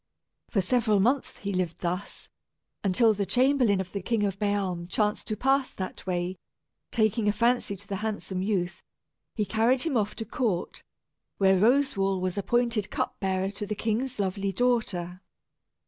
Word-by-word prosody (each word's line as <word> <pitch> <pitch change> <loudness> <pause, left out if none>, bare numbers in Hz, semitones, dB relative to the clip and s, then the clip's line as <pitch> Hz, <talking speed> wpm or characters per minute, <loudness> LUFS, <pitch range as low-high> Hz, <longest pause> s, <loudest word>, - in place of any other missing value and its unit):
For 200 - +2
several 215 +1 +2
months 250 +7 +1
he 200 0 -4
lived 180 -3 -2
thus, 180 +3 -4 0.6
until 215 +3 +4
the 205 -1 -1
chamberlain 255 -6 +3
of 185 -1 -4
the 200 - -3
King 220 +2 0
of 195 -1 -1
Bealm 195 -4 -1
chanced 210 0 0
to 215 - -2
pass 270 +2 +2
that 185 0 -6
way. 180 0 -1 0.5
Taking 220 -1 +1
a - - +5
fancy 235 0 +1
to 200 +1 -13
the 195 - -3
handsome 205 -3 -3
youth, 185 -3 -1 0.5
he 210 - 0
carried 235 +5 +2
him 320 -5 -1
off 210 -2 0
to 225 - -5
court, 210 -5 -2 0.6
where 190 -1 +5
Roswal 200 -3 +3
was 185 -1 -2
appointed 230 0 0
cup - - -3
bearer 190 0 0
to 205 +1 -5
the 210 - -2
king's 230 +5 -1
lovely 195 0 -1
daughter. 195 -6 0
205 Hz, 165 wpm, -27 LUFS, 190-230 Hz, 0.6 s, a